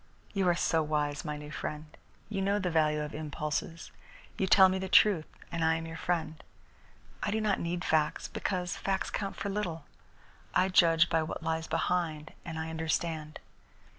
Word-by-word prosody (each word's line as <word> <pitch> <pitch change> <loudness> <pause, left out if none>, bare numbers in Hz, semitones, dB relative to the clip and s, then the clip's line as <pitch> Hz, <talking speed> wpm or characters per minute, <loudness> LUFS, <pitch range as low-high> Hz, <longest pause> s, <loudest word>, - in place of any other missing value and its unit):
You 195 -2 +1
are 175 - +3
so 165 -1 +2
wise, 150 -1 -1
my 150 -2 -4
new 150 0 -9
friend. 150 0 -4 0.4
You 200 -2 -2
know 200 +1 +2
the 185 -3 -1
value 155 -2 +2
of 150 - -6
impulses. 150 +2 -4 0.4
You 190 - 0
tell 190 0 +8
me 190 0 0
the 190 0 -4
truth, 190 -6 +5 0.2
and 165 -1 -1
I 160 0 +4
am 165 0 -4
your 165 0 -7
friend. 165 -1 -2 0.8
I - - -1
do 215 +2 0
not 210 -2 +1
need 175 +1 -2
facts, 155 -1 +1
because 180 -2 -2
facts 195 -1 -1
count 195 -1 -3
for 200 - -3
little. 175 -7 -3 0.7
I 185 - +4
judge 170 -2 +5
by 165 - +2
what 160 0 -5
lies 160 0 -1
behind, 160 -1 -1
and 165 -2 -6
I 160 0 -3
understand. 160 -1 -2
165 Hz, 180 wpm, -30 LUFS, 155-185 Hz, 0.8 s, tell